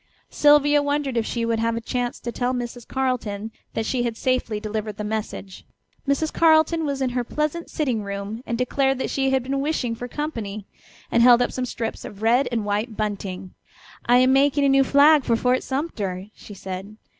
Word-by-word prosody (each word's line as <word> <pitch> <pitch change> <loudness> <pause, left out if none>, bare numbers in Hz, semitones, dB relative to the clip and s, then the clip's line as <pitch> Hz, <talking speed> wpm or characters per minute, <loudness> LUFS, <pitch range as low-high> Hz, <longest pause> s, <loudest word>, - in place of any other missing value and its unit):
Sylvia 290 0 +5
wondered 285 -2 -1
if 230 -2 0
she 235 -1 -2
would 230 -1 0
have 230 0 0
a - - -1
chance 245 +1 -3
to 235 - -4
tell 250 +1 -1
Mrs. 240 -1 -6
Carleton 225 -5 -2 0.2
that 225 - -1
she 250 +2 0
had 235 -2 -2
safely 250 -4 0
delivered 215 -1 -4
the 210 - -4
message. 210 -3 -5 0.4
Mrs. 295 +3 0
Carleton 320 0 +4
was 275 -1 -2
in 255 - 0
her 245 0 -1
pleasant 305 +6 -3
sitting 255 -8 -1
room 200 +2 -5
and 235 - -1
declared 270 +2 +1
that 265 - -3
she 270 -1 +1
had 265 -1 +1
been 275 +2 -2
wishing 275 -5 -1
for 245 +2 -6
company, 225 -9 -5 0.5
and 235 - +3
held 240 0 +7
up 245 - +1
some 255 - -2
strips 230 -2 -4
of 205 +1 -9
red 245 +5 +3
and 225 -3 -1
white 210 +2 -2
bunting. 195 -3 -4 0.5
"I 245 +1 +6
am 255 +1 +4
making 280 +1 +3
a - - +4
new 270 0 +5
flag 285 +2 +5
for 230 - +2
Fort 250 +2 +1
Sumter," 210 - -4
she 205 - -12
said. 190 +3 -7
245 Hz, 200 wpm, -23 LUFS, 215-275 Hz, 0.5 s, held